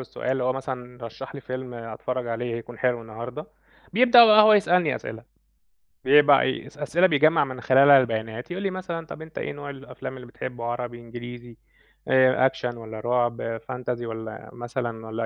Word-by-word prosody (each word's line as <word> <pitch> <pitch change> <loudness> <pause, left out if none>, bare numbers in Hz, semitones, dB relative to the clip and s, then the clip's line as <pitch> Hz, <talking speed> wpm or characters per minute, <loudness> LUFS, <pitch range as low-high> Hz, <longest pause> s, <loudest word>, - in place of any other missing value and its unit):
السؤال 130 0 -4
اللي 135 -1 -1
هو 130 - +2
مثلًا 125 -2 -7
رشّح 125 +5 -9
لي 140 - -7
فيلم 130 0 -7
أتفرّج 120 +2 -5
عليه 115 0 -3
يكون 115 0 -9
حلو 125 -2 0
النهارده، 115 +6 -8 0.5
بيبدأ 240 +1 +8
بقي 215 -1 +7
هو 215 - +7
يسألني 180 -5 +3
أسئلة، 115 +1 -7 0.8
بيبقى 145 +1 +6
إيه 130 - -2
أس - - -16
أسئلة 165 +5 +2
بيجمّع 155 0 +4
من 130 -1 -8
خلالها 135 +1 +7
البيانات، 115 +2 -4
يقول 190 +3 -4
لي 195 - 0
مثلًا 175 -3 -5
طَب 160 - -9
أنت 160 0 -12
إيه - - -3
نوع 145 0 -8
الأفلام 135 -1 -8
اللي 125 -1 -11
بتحبّه 120 0 -7
عربي، 120 0 -4
إنجليزي، 120 0 -10 0.5
آآ 130 0 +4
أكشن 125 -2 -2
والّا 110 -1 -8
رُعب، 120 -1 -1
fantasy 125 -1 -4
والّا 110 -1 -7
مثلًا 120 -2 -5
والّا 115 +1 -3
125 Hz, 175 wpm, -24 LUFS, 120-140 Hz, 0.8 s, بيبدأ